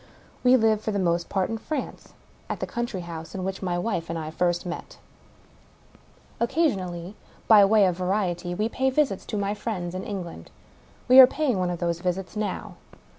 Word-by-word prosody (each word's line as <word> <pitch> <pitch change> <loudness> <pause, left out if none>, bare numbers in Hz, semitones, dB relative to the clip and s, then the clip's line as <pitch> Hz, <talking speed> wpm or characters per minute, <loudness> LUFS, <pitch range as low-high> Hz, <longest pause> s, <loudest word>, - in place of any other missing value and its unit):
We 250 0 +6
live 220 -2 +2
for 220 - -3
the 205 - -1
most 170 -2 0
part 190 +1 0
in 225 - -3
France 305 +6 -5 0.2
— - - -31
^at - - -2
the - - -3
country 240 -5 -4
house 165 0 -8
in 185 - -4
which 190 0 -4
my 180 -2 -1
wife 175 -3 -2
and 165 - -2
I 155 -1 -5
first 175 +1 0
met. 175 -1 -7 1.4
Occasionally, 195 - -1 0.3
by 215 -2 +8
way 210 0 +5
of 180 -2 0
variety, 180 -2 -1
we 215 +4 0
pay 265 +3 0
visits 265 -7 0
to 215 - -3
my 200 0 -1
friends 200 -5 -4
in 185 - -4
England. 175 - -6 0.6
We 255 +1 +8
are 260 - +12
paying 265 -8 0
one 180 -1 0
of 175 - -2
those 170 -1 -1
visits 180 +2 -3
now. 210 -1 -4
190 Hz, 190 wpm, -25 LUFS, 175-220 Hz, 1.4 s, are